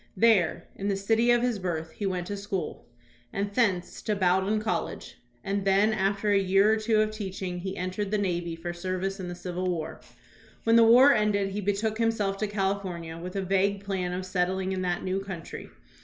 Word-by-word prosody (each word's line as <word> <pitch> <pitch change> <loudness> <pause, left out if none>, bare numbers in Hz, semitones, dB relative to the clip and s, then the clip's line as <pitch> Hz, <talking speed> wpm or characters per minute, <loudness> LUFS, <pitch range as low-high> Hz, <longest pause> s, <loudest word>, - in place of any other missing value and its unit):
There, 200 -6 +3
in 200 - -4
the 200 - +1
city 225 +4 +2
of 240 0 +4
his 245 -4 0
birth, 165 -3 -3
he 205 - -3
went 180 -2 -2
to 205 - -4
school, 200 -2 -4 0.4
and 200 +1 -3
thence 200 -7 0
to 210 - -1
Bowdoin 190 +2 +2
College, 195 -6 -3 0.2
and 200 0 -1
then 200 +3 +3
after 200 0 0
a 200 - +5
year 195 +3 +4
or - - +2
two 215 0 +2
of 215 0 0
teaching 190 -4 -5
he 190 +2 -5
entered 185 +3 -3
the 210 - +1
navy 175 -4 -1
for 175 +1 -5
service 185 +2 -3
in 185 - -5
the 175 - -5
Civil 180 +1 -3
War. 165 -3 -4 0.6
When 230 0 +4
the 230 - +8
war 250 +5 +8
ended 210 -3 +1
he 205 +2 -3
betook 210 +3 -1
him 230 -1 +3
seK 205 -3 -1
to 215 - 0
California 190 -5 -3
with 180 +2 -7
a 195 - -1
vague 195 +1 +1
plan 190 -3 -2
of 185 +1 -3
settling 185 +1 -1
in 190 -1 -2
that 175 -1 -1
new 190 +1 -1
country. 185 -4 -7
195 Hz, 205 wpm, -27 LUFS, 185-210 Hz, 0.6 s, the